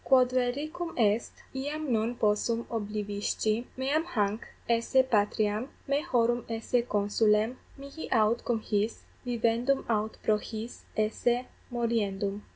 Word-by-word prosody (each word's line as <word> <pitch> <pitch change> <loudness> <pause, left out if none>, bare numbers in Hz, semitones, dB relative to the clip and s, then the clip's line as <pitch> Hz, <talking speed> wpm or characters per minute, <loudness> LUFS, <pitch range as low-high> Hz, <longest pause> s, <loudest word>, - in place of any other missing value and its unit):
Quod 255 -2 +5
reliquum 285 +7 -1
est, 220 -1 +2 0.2
iam 290 +1 -2
non 225 +2 +1
possum 230 +2 +1
oblivisci, 210 +1 -1
meam 280 +5 +1
hanc 210 -8 -1 0.2
esse 235 +3 +3
patriam, 215 0 +1 0.2
me 280 +1 +2
horum 240 -6 +2
esse 230 +2 +1
consulem, 210 +1 +2 0.2
mihi 280 +3 -8
aut 225 0 +3
cum 235 -2 0
his 215 +1 -1 0.2
vivendum 240 +2 +1
aut 215 -1 0
pro 215 -1 +3
his 220 +2 -7
esse 240 +3 +1 0.3
moriendum. 210 -4 -1
230 Hz, 120 wpm, -29 LUFS, 215-255 Hz, 0.3 s, Quod